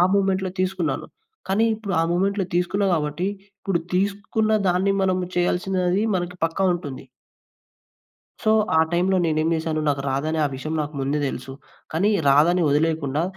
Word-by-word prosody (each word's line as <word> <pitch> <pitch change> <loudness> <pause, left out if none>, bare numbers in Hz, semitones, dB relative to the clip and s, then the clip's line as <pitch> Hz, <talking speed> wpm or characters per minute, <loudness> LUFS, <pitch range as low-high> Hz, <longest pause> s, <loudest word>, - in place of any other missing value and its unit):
మూమెంట్‌లో 190 -1 +1
తీసుకున్నాను. 185 -7 -1 0.4
కానీ 215 +4 +3
ఇప్పుడు 210 -3 -5
ఆ - - +2
మూమెంట్‌లో 195 +2 +1
తీసుకున్నా 180 +3 +1
కాబట్టి 155 +4 -2 0.3
ఇప్పుడు 190 -3 -1
తీసుకున్న 200 +3 0 0.2
దాన్ని 185 +2 +2
మనం 185 -1 +2 0.2
చేయాల్సినది 180 +1 +1
మన 180 - 0 0.2
పక్కా 165 +4 -2
ఉంటుంది. 145 -7 -6 1.4
సో, 215 - +3 0.3
ఆ - - +6
టైమ్‌లో 185 +2 +2
నేనేం 155 0 +1
చేశాను. 160 -1 -2
నాకు 140 -1 0
రాదని 155 +4 -1
ఆ - - +2
విషయం 155 +4 -5
నాకు 150 +1 -5
ముందే 140 +2 0
తెలుసు. 135 0 -6 0.4
కానీ 175 +6 +2 0.2
రాదని 165 +5 +4
వదిలేయకుండా 150 0 +1
175 Hz, 140 wpm, -23 LUFS, 155-190 Hz, 1.4 s, ఆ